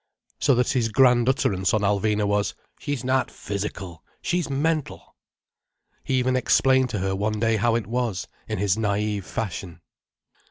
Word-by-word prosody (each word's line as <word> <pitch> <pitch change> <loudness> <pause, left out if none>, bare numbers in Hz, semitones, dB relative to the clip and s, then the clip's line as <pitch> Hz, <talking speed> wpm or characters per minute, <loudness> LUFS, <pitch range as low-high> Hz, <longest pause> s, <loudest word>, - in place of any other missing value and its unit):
So 135 - +3
that 125 0 +1
his 120 -4 +1
grand 125 0 +4
utterance 100 -6 +1
on 110 - +1
Alvina 105 +1 +1
was: 100 0 0 0.2
"She's 145 -4 -3
not 130 0 +1
physical, 95 -4 -6 0.2
she's 175 -4 -1
mental." 150 +2 -2 0.9
He 135 - -1
even 130 0 +1
explained 130 0 +3
to 110 - -3
her 95 0 -1
one 105 +2 -1
day 115 0 +2
how 115 +2 +2
it 115 -3 -1
was, 115 -4 -2 0.2
in - - -3
his 100 0 +1
naïve 105 -1 -1
fashion. 95 -5 -5
110 Hz, 155 wpm, -24 LUFS, 100-130 Hz, 0.9 s, grand